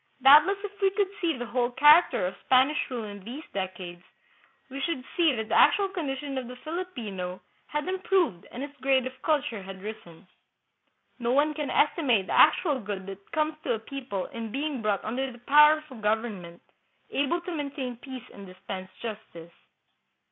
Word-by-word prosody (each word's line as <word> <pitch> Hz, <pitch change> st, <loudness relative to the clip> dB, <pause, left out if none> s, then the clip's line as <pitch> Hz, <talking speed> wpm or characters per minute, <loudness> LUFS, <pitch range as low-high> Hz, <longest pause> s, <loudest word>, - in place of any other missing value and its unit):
Doubt 290 Hz, +4 st, +9 dB
less 395 Hz, 0 st, 0 dB
if 410 Hz, 0 st, -8 dB
we 390 Hz, -, +5 dB
could 395 Hz, 0 st, -1 dB
see 330 Hz, -5 st, 0 dB
the 245 Hz, -, -4 dB
whole 240 Hz, 0 st, 0 dB
character 295 Hz, -, +5 dB
of 180 Hz, -, -3 dB
Spanish 265 Hz, +4 st, +3 dB
rule 245 Hz, -3 st, -4 dB
in 205 Hz, -2 st, -8 dB
these 255 Hz, +9 st, -7 dB
decades, 185 Hz, -2 st, -5 dB, 0.7 s
we 275 Hz, +1 st, -5 dB
should 270 Hz, -4 st, -2 dB
see 335 Hz, -3 st, +4 dB
that 220 Hz, -1 st, -4 dB
the -, -, -2 dB
actual 400 Hz, -1 st, +5 dB
condition 280 Hz, -6 st, -3 dB
of 250 Hz, -, -7 dB
the 250 Hz, -, -8 dB
Filipino 240 Hz, -, -5 dB, 0.3 s
had 300 Hz, +1 st, -3 dB
improved 370 Hz, -, 0 dB
and 250 Hz, -, -6 dB
his 285 Hz, 0 st, -8 dB
grade 265 Hz, -2 st, +2 dB
of 260 Hz, 0 st, -8 dB
culture 290 Hz, -9 st, 0 dB
had 190 Hz, 0 st, -10 dB
risen. 205 Hz, -5 st, -9 dB, 0.9 s
No 235 Hz, -1 st, -1 dB
one 295 Hz, +3 st, +3 dB
can 295 Hz, -2 st, -4 dB
estimate 285 Hz, -, +2 dB
the -, -, -4 dB
actual 295 Hz, -7 st, +5 dB
good 200 Hz, -3 st, -5 dB
that 195 Hz, 0 st, -10 dB
comes 310 Hz, 0 st, 0 dB
to -, -, 0 dB
a -, -, -6 dB
people 245 Hz, -5 st, -5 dB
in 225 Hz, -2 st, -7 dB
being 280 Hz, 0 st, -3 dB
brought 210 Hz, -3 st, -1 dB
under 260 Hz, +4 st, -2 dB
the 240 Hz, -, -12 dB
power 300 Hz, +5 st, +6 dB
of -, -, -22 dB
a 240 Hz, -4 st, -10 dB
government 210 Hz, -5 st, -2 dB, 0.5 s
able 285 Hz, +5 st, 0 dB
to 345 Hz, 0 st, -6 dB
maintain 280 Hz, -4 st, -4 dB
peace 260 Hz, -1 st, -9 dB
and 200 Hz, -1 st, -11 dB
dispense 185 Hz, 0 st, -8 dB
justice. 170 Hz, -7 st, -8 dB
260 Hz, 185 wpm, -27 LUFS, 210-300 Hz, 0.9 s, Doubt